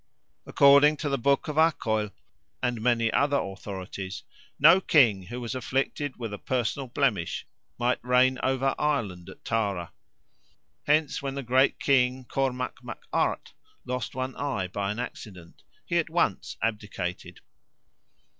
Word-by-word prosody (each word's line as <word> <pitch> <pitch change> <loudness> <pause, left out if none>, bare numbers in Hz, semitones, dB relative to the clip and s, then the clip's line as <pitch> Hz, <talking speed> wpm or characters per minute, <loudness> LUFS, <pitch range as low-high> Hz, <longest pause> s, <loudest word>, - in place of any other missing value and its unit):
According 140 +2 +6
to 145 0 -2
the 140 -1 0
Book 140 +3 +2
of 150 0 -4
Acaill 110 -10 +2 0.5
and 120 -3 -1
many 115 -1 +2
other 145 0 +2
authorities 95 -2 -6 0.3
no 165 +6 +7
king 110 - +4
who 120 +2 -6
was 120 -2 -4
afflicted 130 +2 -2
with 115 -4 -5
a 105 - -6
personal 130 +2 -2
blemish 120 - -1 0.3
might 120 +1 0
reign 125 +1 +3
over 135 +1 +1
Ireland 105 -13 -1
at - - -14
Tara. 100 -6 -1 0.9
Hence, 150 0 +2
when 135 -1 -4
the 140 - -4
great 130 +3 +3
King 130 -1 +2
Cormac 125 -1 -2
Mac - - -8
Art - - 0 0.3
lost 125 -1 -4
one 130 0 -3
eye 130 -10 -2
by 100 +1 -3
an 105 - -5
accident, 95 -8 -8 0.2
he - - +1
at - - -2
once - - -1
abdicated. 105 -5 -4
125 Hz, 140 wpm, -27 LUFS, 105-140 Hz, 0.9 s, no